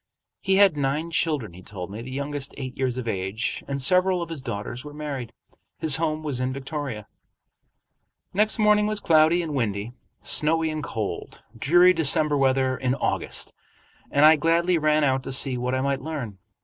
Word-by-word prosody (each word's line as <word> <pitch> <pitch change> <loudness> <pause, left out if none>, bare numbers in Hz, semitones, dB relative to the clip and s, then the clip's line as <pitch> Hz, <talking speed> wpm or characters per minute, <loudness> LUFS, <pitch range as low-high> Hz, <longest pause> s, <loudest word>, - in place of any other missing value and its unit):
He 190 -1 +1
had 195 -4 +5
nine 145 +4 -1
children, 150 - -1
he 90 - -12
told 95 -1 -8
me, 105 +3 -7
the 125 - -9
youngest 140 +1 -4
eight 130 -2 -6
years 130 -2 -2
of 125 -2 -5
age, 95 +1 -3
and 140 0 -3
several 180 +6 +3
of 170 - -9
his 160 -4 -5
daughters 120 0 -5
were 150 0 -10
married. 140 -6 -5 0.5
His 155 -4 +4
home 155 -1 -2
was 145 -5 -2
in 130 0 -1
Victoria. 135 -5 -5 1.3
Next 210 +3 +2
morning 210 -1 +3
was 215 -1 0
cloudy 165 -1 +3
and 155 -3 -5
windy, 110 -4 -2 0.3
snowy 160 +1 +2
and 155 -1 -4
cold, 110 -7 -5
dreary 175 +10 +5
December 155 -2 +3
weather 130 -1 +2
in 130 +1 -1
August, - - -2 0.6
and 145 +1 +4
I 155 0 +7
gladly 170 +3 +2
ran 155 0 +2
out 135 -2 +1
to 130 - -7
see 130 0 +2
what 125 +1 -2
I 130 - -1
might 140 0 -1
learn. 130 -10 -6
140 Hz, 180 wpm, -24 LUFS, 125-160 Hz, 1.3 s, I